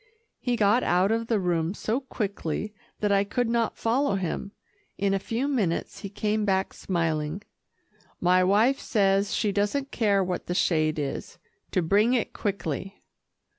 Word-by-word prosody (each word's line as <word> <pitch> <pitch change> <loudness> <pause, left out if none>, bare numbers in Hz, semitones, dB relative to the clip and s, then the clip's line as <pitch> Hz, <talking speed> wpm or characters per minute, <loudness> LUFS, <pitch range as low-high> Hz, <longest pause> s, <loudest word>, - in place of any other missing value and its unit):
He 245 -2 0
got 215 +2 +3
out 185 +1 +2
of 230 0 0
the 225 -3 +2
room 175 0 0
so 225 +5 -1
quickly, 210 - -4 0.3
that 210 -1 +1
I 200 0 +4
could 240 +4 -1
not 230 -1 0
follow 240 0 +1
him. 195 +1 -3 0.5
In 195 0 +1
a 195 - +1
few 230 +7 -2
minutes 210 -12 -1
he 200 - -6
came 210 +1 -1
back 190 -1 0
smiling. 165 0 -2 0.8
"My 180 +1 +4
wife 215 +8 +3
says 195 -2 +2
she 210 - +1
doesn't 210 +8 -1
care 200 -4 +2
what 180 -1 -3
the 175 - -2
shade 155 -3 +2
is 140 -2 -4 0.3
to 185 - 0
bring 210 +8 +3
it 235 - -1
quickly." 195 -1 -4
200 Hz, 160 wpm, -26 LUFS, 180-225 Hz, 0.8 s, I